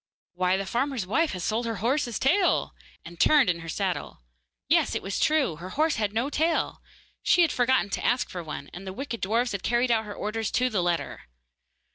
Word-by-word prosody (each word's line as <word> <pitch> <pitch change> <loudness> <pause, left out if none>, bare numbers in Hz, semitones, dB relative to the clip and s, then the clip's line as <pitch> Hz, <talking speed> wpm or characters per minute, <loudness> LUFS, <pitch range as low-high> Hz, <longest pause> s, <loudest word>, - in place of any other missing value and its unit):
'Why, 180 +1 +1
the 195 - -3
farmer's 245 0 -1
wife 305 - +1
has 180 -2 -5
sold 230 +4 -1
her 225 - -2
horse's 240 +3 0
tail!' 355 +8 +2 0.3
and 170 0 -11
turned 290 -11 +5
in 170 - -5
her 165 0 -8
saddle. 60 - -3 0.4
Yes; - - +3
it - - -2
was 195 - -3
true. 300 - +2
Her 180 +3 -8
horse 310 +7 +1
had 210 -2 0
no 235 +7 -1
tail! 320 +3 0 0.4
She 350 - +4
had 325 - +2
forgotten 245 -4 +2
to - - -2
ask 245 +2 +1
for 180 - -6
one, 150 -3 -7
and 190 +3 -9
the 190 - -5
wicked 245 0 -5
dwarfs 230 +5 +1
had 200 -2 -3
carried 240 +4 +1
out 220 -1 +2
her 205 -1 -7
orders 215 0 -2
to 255 0 +2
the 200 -4 +1
letter! 175 - -2
225 Hz, 210 wpm, -26 LUFS, 185-260 Hz, 0.4 s, turned